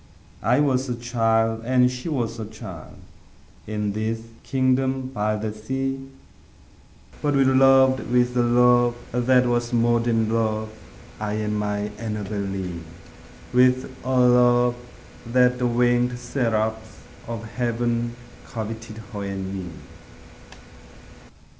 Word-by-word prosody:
I 120 +5 +2
was 135 -2 +1
a 120 - -1
child 115 -2 +1
and 125 +1 +3
she 125 +6 -5
was 120 -6 -2
a 110 - -4
child, 110 0 -10 0.7
In 105 -1 -2
this 110 +2 -2 0.2
kingdom 130 0 0
by 105 -2 0
the 105 0 -3
sea; 135 +4 -4 1.1
But 145 -1 +1
we 135 - +4
loved 130 -1 +4
with 125 0 +2
a 125 - +3
love 120 0 +4 0.2
that 125 +1 +3
was 120 0 0
more 120 0 +3
than 115 -1 +1
love 110 -1 0 0.5
I 105 -1 -2
and 105 0 -2
my 105 0 -2
Annabel 105 -2 -4
Lee; 95 -3 -4 0.7
With 130 +1 +3
a 130 0 +1
love 125 0 +4 0.5
that 125 +1 +3
the 125 - +1
winged 120 +1 +2
seraphs 110 -3 -2 0.3
of 115 -1 -5
heaven 120 -1 -1 0.3
Coveted 110 +4 -6 0.2
her 100 -1 -4
and 95 -1 -4
me. 95 -2 -5
120 Hz, 120 wpm, -23 LUFS, 110-125 Hz, 1.1 s, we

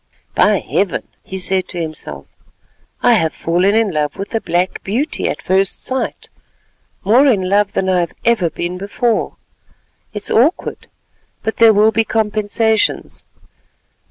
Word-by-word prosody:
"By - - +4
Heaven!" - - -1
he 190 - -7
said 190 0 -1
to 175 - -6
himself, 155 - -6 0.8
"I - - +6
have 160 -1 +1
fallen 180 +5 +1
in 225 -3 +2
love 150 -1 -2
with 195 +3 -6
a 225 - 0
black 175 +2 -1
beauty 245 +10 -1
at - - -5
first 190 +1 0
sight—more 260 -1 -2
in 200 -8 +2
love 205 +1 +2
than 190 - 0
I 185 -1 +2
have 170 -1 -2
ever 225 -8 +2
been 175 +3 -4
before. 220 +4 -1 0.8
It's 210 -1 -3
awkward, 275 - +1 0.6
but 220 - -2
there 230 -1 +7
will 215 +1 +4
be 225 0 +2
compensations. 220 0 0
200 Hz, 140 wpm, -17 LUFS, 180-225 Hz, 0.8 s, there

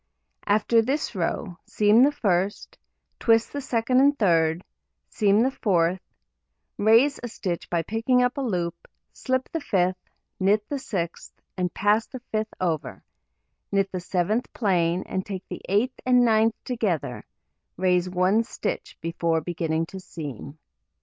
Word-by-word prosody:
After 215 +3 +3
this 270 +5 -2
row, 180 -1 -3
seam 210 +2 +4
the 275 - +6
1st, 200 -9 -1 0.4
twist 225 -1 +3
the 285 - -2
2d 255 -1 +1
and 285 +1 +4
3d, 165 - +2 0.5
seam 210 +1 +3
the 265 - +1
4th, 180 -6 +1 0.8
raise 230 +7 +4
a 240 - -4
stitch 180 -6 -4
by 170 -1 0
picking 240 +5 +1
up 250 0 0
a 280 - -3
loop, 180 -9 -1 0.4
slip 260 -1 -1
the 330 - -2
5th, 185 - +1 0.5
knit 205 +2 +2
the 285 - -2
6th, 175 -10 -4 0.2
and 180 -2 -1
pass 210 +2 +2
the 260 - -8
5th 215 0 0
over, 160 -7 -2 0.7
knit 195 -1 +1
the 185 - -3
7th 185 +6 0
plain, 180 -4 +1
and 190 - -3
take 190 -2 -7
the - - -6
8th 210 +6 +2
and 250 -1 +4
9th 225 -1 +3
together, 175 - -2 0.5
raise 180 0 +2
one 185 +5 +2
stitch 415 - -5
before 165 -1 0
beginning 165 -1 -2
to 190 +3 -9
seam. 145 - -8
200 Hz, 145 wpm, -25 LUFS, 175-235 Hz, 0.8 s, the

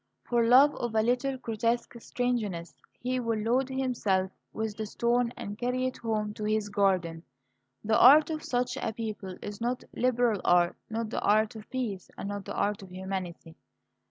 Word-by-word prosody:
For 240 -1 +2
love 260 +5 +6
of 235 -2 -3
a 220 - +4
little 250 +3 0
grotesque 230 0 -1
strangeness 220 -10 -2 0.3
he 255 +1 -1
will 230 -2 -1
load 245 +5 +1
himself 235 -8 0 0.2
with 220 -1 -3
the 215 0 -4
stone 235 +2 +1
and 210 -3 -6
carry 250 +1 0
it 255 - -3
home 215 -2 -2
to 210 - -7
his 215 0 0
garden. 185 -5 +1 0.6
The 220 +1 +2
art 295 +6 +8
of 310 -1 -4
such 245 0 -1
a 220 - -2
people 210 -4 -5
is 205 +1 -7
not 245 +2 -1
liberal 245 -5 +2
art, 175 -1 +4
not 225 0 -3
the - - -2
art 215 +1 +2
of 215 -1 -10
peace, 225 -8 -4
and 200 - -5
not 205 -1 -5
the - - -6
art 205 0 0
of 190 - -11
humanity. 185 -3 -6
220 Hz, 180 wpm, -29 LUFS, 205-245 Hz, 0.6 s, art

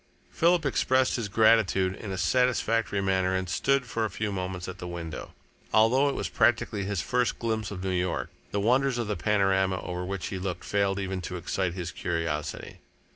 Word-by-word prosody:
Philip 170 -1 +3
expressed 130 -1 +2
his 115 -4 -3
gratitude 100 -4 +4
in 100 -1 -7
a 95 - -3
satisfactory 115 +1 +1
manner 95 -1 +1
and 95 0 -1
stood 135 +10 +1
for 115 -2 -2
a 110 - 0
few 105 +3 -3
moments 90 -2 -4
at 95 0 -7
the 90 - -6
window. 85 -2 -6 0.4
Although 125 +6 +4
it - - -2
was - - -2
practically 110 -4 +1
his 100 -3 -1
first 125 -1 0
glimpse 110 -2 -2
of 95 -2 -6
New 95 - -1
York, 90 -1 -1 0.2
the 100 - -1
wonders 125 +4 +2
of 120 - -1
the 105 0 -2
panorama 95 -3 +2
over 90 0 -4
which 95 0 -4
he 95 - -4
looked 90 -1 -4
failed 100 -1 0
even 95 -1 -3
to 90 +1 -5
excite 90 0 -2
his 90 -2 -4
curiosity. 80 -4 -3
100 Hz, 190 wpm, -27 LUFS, 90-115 Hz, 0.4 s, gratitude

